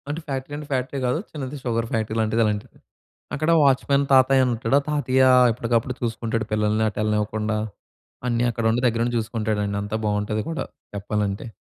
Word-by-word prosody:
అంటే 150 +3 -3
ఫ్యాక్టరీ 135 0 -4
అంటే, 150 -1 -8
ఫ్యాక్టరీ 135 +1 -1
గాదు. 125 +5 +1
చిన్నది 145 -1 -6
షుగర్ 115 -2 -1
ఫ్యాక్టరీ 110 -1 -1
లాంటిది, 110 +1 +1
అలాంటిది. 105 -1 -3 0.6
అక్కడ 155 +3 +1
వాచ్‌మెన్ 140 +1 +3
తాతయ్యనుంటాడు. 130 -2 +3
ఆ - - -17
తాతయ్య 130 -3 +2 0.3
ఎప్పటికప్పుడు 115 +1 -1
చూసుకుంటాడు 115 -1 -2
పిల్లల్ని 105 +1 +1
అటేళ్ళనివ్వకుండా. 105 +1 -1 0.7
అన్నీ 120 0 +1
అక్కడుండి 115 +1 0
దగ్గరుండి 120 +1 0
జూసుకుంటాడండి, 110 -2 -2
అంతా 105 +1 -4
బాగుంటది 105 +1 -1
కూడా, 165 - -3 0.3
చెప్పాలంటే. 100 +1 -2
115 Hz, 140 wpm, -23 LUFS, 110-130 Hz, 0.7 s, వాచ్‌మెన్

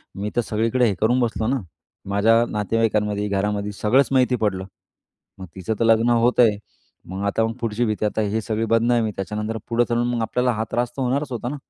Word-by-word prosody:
मी 100 +2 -3
तर 120 - +3
सगळीकडे 115 +3 0
हे 100 - 0
करून 120 +3 +3
बसलो 115 -2 -1
ना! 135 +2 +1 0.5
माझ्या 110 +4 +4
नातेवाईकांमध्ये, 105 -1 0
घरामध्ये 100 +1 -1
सगळंच 130 +6 +4
माहिती 130 -1 +3
पडलं. 100 -5 -1 0.7
मग 95 - -7
तिचं 95 +3 -3
तर 115 - +2
लग्न 115 +1 +4
होत 120 +1 +2
आहे. 110 -4 +5 0.5
मग 95 +2 -5
आता 100 +3 +1
मग 115 - -3
पुढची 115 +1 -1
भीती 110 -1 -1
आता 105 +1 -1
ही 105 +1 -1
सगळी 110 +1 -2
बदनामी. 115 0 +2
त्याच्यानंतर 105 +3 -4
पुढं 120 +1 +2
चलून 120 0 +1
मग 115 - -1
आपल्याला 125 +2 0
हा 110 0 -2
त्रास 120 0 0
तर - - -2
होणारच 135 +3 -1
होता 120 -1 -4
ना! 145 - -4
115 Hz, 200 wpm, -22 LUFS, 105-120 Hz, 0.7 s, आहे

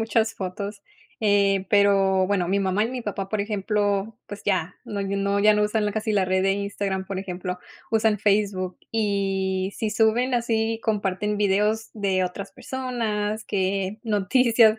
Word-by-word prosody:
muchas 225 0 +1
fotos, 200 +2 -5 0.4
eh, 200 -2 +2
pero 195 -2 +4
bueno, 195 -3 +1
mi 195 +3 +1
mamá 195 +2 +1
y - - -1
mi 255 -1 -4
papá, 200 -2 -4
por 215 +1 -1
ejemplo, 205 0 -1
pues, 205 0 -8
ya 185 -3 0
no 205 - -4
no, 200 +1 0
ya 210 +1 +6
no 210 - +2
usan 210 0 +1
casi 220 +1 -2
la 200 -2 +3
red 185 0 +1
de 195 - +3
Instagram, 200 -1 -2
por 190 0 -4
ejemplo, 180 -1 -4 0.3
usan 220 -1 +2
Facebook, 200 -3 +1
y 195 -3 0
sí 220 - -1
suben 225 +4 +2
así, 225 -1 0
comparten 210 -1 0
videos 210 +2 +1
de 195 -3 +1
otras 185 +2 -4
personas, 225 -4 -3
que 195 +1 -1
noticias 225 +2 +4
205 Hz, 160 wpm, -24 LUFS, 195-215 Hz, 0.4 s, ya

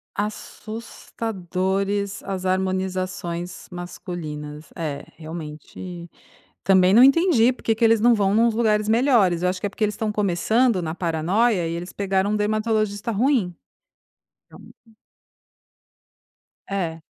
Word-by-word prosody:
Assustadores 200 -2 -3
as 190 -2 -4
harmonizações 185 -2 -2
masculinas, 155 -4 -7
é 150 -4 -4
realmente, 165 +2 -8 0.5
também 190 -1 +5
não 235 +4 +8
entendi 275 -4 +5
porque 230 -3 -1
que 230 - -2
eles 225 0 +5
não 235 +2 +5
vão 200 -2 +1
nos 230 +1 +3
lugares 215 -2 +1
melhores, 220 -7 +3
acho 180 +1 0
que 205 - -1
é - - -6
porque 215 - -4
eles 210 -1 0
estão 215 -1 -2
começando 210 +3 +2
na 160 -1 -4
paranoia 175 +4 +1
e 165 - -3
eles 175 +2 -5
pegaram 195 0 0
um 210 - +1
dermatologista 215 0 0
ruim. 225 -4 +1 1.0
Ah - - -12
um - - -15 2.0
É. 170 -5 -3
195 Hz, 120 wpm, -23 LUFS, 175-220 Hz, 2.0 s, não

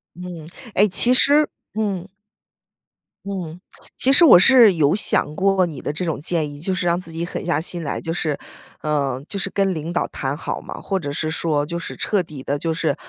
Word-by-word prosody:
嗯， 175 -3 -8 0.3
诶， 205 +3 +4
其 235 +6 +6
实 290 +4 +5 0.3
嗯。 200 -4 -3 1.2
嗯， 180 -4 -6 0.4
其 270 - +3
实 340 - +7
我 250 - +9
是 235 -2 +6
有 150 -1 +2
想 155 -6 +1
过 195 0 +2
你 155 -6 -7
的 - - -3
这 165 +5 -4
种 160 -4 -3
建 160 -2 -2
议， 145 - -10
就 175 +6 -3
是 180 -1 -2
让 170 0 +2
自 175 -2 -5
己 165 +1 -4
狠 170 - -6
下 170 -3 0
心 170 +1 -3
来， 140 - -3
就 165 - -4
是 155 -4 -2 0.4
呃， 140 -4 -1
就 200 - -4
是 195 - -2
跟 195 -1 0
领 160 +1 -5
导 175 - -1
谈 135 +1 -4
好 - - -5
嘛， - - -9
或 195 - -2
者 145 -6 -5
是 155 +2 -2
说 155 -2 -1
就 170 +3 -5
是 170 - -7
彻 200 -4 0
底 150 -5 -10
地 140 +2 -2
就 165 +2 -2
是 160 0 -1
170 Hz, 230 characters per minute, -21 LUFS, 155-195 Hz, 1.2 s, 我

